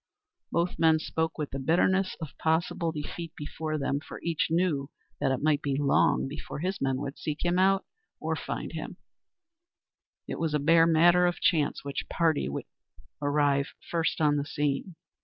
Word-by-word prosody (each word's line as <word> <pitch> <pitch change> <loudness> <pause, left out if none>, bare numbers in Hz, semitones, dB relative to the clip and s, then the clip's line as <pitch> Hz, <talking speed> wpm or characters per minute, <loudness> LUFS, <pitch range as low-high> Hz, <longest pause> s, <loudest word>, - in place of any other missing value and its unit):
Both 170 +2 0
men 160 -1 +5
spoke 160 +1 -2
with 150 -2 -3
the 135 - -4
bitterness 185 +6 +2
of 160 -5 -7
possible 165 +1 +1
defeat 160 +2 -6
before 155 +1 -4
them, 140 0 -1
for - - -9
each 165 -2 0
knew 160 -5 +1 0.3
that 135 - +1
it 135 +1 -1
might 150 -1 +3
be 140 -1 -1
long 140 -1 +3
before 150 +3 -7
his 185 +6 -3
men 135 -1 +1
would 140 +1 -5
seek 150 +2 -3
him 175 +1 +2
out 195 +1 +3 0.3
or - - -1
find - - -5
him; - - -6 1.3
it - - -4
was 160 -2 0
a - - +2
bare 165 +3 +5
matter 175 +2 +5
of 175 - -1
chance 150 -4 +1
which 140 0 -4
party 160 - +1
would 70 - -4 0.6
arrive 145 -1 +1 0.2
first 165 -1 0
on 150 -2 +3
the 145 - -1
scene. 145 +5 -2
155 Hz, 175 wpm, -28 LUFS, 145-170 Hz, 1.3 s, men